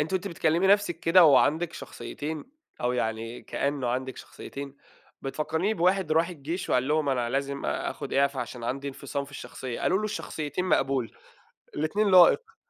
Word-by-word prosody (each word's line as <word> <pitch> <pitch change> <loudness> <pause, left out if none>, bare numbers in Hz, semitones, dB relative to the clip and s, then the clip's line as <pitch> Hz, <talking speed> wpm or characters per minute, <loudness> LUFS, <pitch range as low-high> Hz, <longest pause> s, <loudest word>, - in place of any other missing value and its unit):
أنتِ 155 +5 -1
وأنتِ 190 +1 -1
بتكلمي 165 +2 +1
نفسِك 200 -4 +3
كده 170 +1 +6
وعندِك 155 +3 +4
شخصيتين، 155 0 -6 0.4
أو 125 0 +1
يعني 115 0 -3
كأنه 140 -2 -2
عندِك 130 +1 -2
شخصيتين، 140 0 -9 0.5
بتفكريني 160 +9 -1
بواحد 180 -2 +2
راح 165 +2 +3
الجيش 170 +2 -5
وقال 125 +2 +2
لهم 155 -1 +1
أنا 125 -3 0
لازم 140 +1 -2
آخد 140 - -3
إعفا 140 -1 +2
عشان 120 0 -6
عندي 135 +4 -3
انفصام 140 +1 -4
في 140 - -15
الشخصية، 130 -3 -7
قالوا 190 - +2
له 215 - -3
الشخصيتين 165 -5 -3
مقبول، 135 -8 0 0.6
الاتنين 200 +7 +1
لائق. 440 - +6
150 Hz, 155 wpm, -27 LUFS, 135-175 Hz, 0.6 s, كده